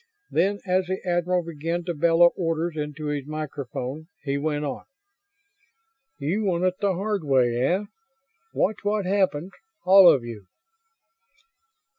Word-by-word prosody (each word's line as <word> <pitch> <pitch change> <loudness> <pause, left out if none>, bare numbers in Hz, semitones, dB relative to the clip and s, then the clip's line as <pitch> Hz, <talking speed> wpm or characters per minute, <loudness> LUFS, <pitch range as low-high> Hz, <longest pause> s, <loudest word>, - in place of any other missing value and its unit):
Then, 195 +5 +2
as 185 -1 +1
the 190 +1 -2
admiral 175 0 +1
began 165 +2 -3
to 175 - -2
bellow 170 +2 +4
orders 165 -1 -1
into 150 0 -5
his 145 -2 -3
microphone, 150 -1 -5 0.2
he 140 -2 -1
went 150 +1 -1
on: 140 - -5 1.3
"You 180 +10 -1
want 180 -3 0
it 185 0 0
the 200 -2 +1
hard 200 0 -2
way, 130 -4 +2
eh? 180 +10 +1 0.7
Watch 210 +2 0
what 205 -1 -1
happens, 185 -3 0 0.3
all 190 0 +9
of 130 - +1
you!" 110 -5 -9
170 Hz, 135 wpm, -25 LUFS, 145-185 Hz, 1.3 s, all